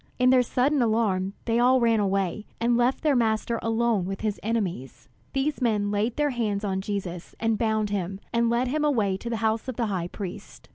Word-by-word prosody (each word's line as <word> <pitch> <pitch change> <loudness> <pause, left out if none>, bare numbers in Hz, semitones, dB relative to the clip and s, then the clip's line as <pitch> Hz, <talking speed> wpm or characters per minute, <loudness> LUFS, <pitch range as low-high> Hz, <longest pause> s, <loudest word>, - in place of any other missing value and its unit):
In 250 0 +4
their 255 -1 +6
sudden 260 +3 +1
alarm 210 -5 +1
they 230 0 +1
all 255 +2 +5
ran 230 -2 +3
away, 195 0 -1
and 235 +1 +2
left 245 +4 +1
their 300 -3 +3
Master 230 -1 +1
alone 225 -4 +1
with 195 +1 -5
his 215 -2 -2
enemies. 180 - -3 0.3
These 280 +1 -1
men 210 -4 +1
laid 210 +3 0
their 295 -1 +1
hands 215 -4 -1
on 190 -1 -1
Jesus, 190 -4 -5
and 225 -1 +1
bound 215 -1 0
him, 195 -1 -2
and 235 0 +2
led 240 +2 +1
him 300 +3 0
away 220 -10 +2
to 235 - -6
the 230 - -1
house 220 +2 0
of 255 - -4
the 235 - 0
high 175 -2 -2
priest. 185 0 -8
225 Hz, 205 wpm, -26 LUFS, 200-240 Hz, 0.3 s, their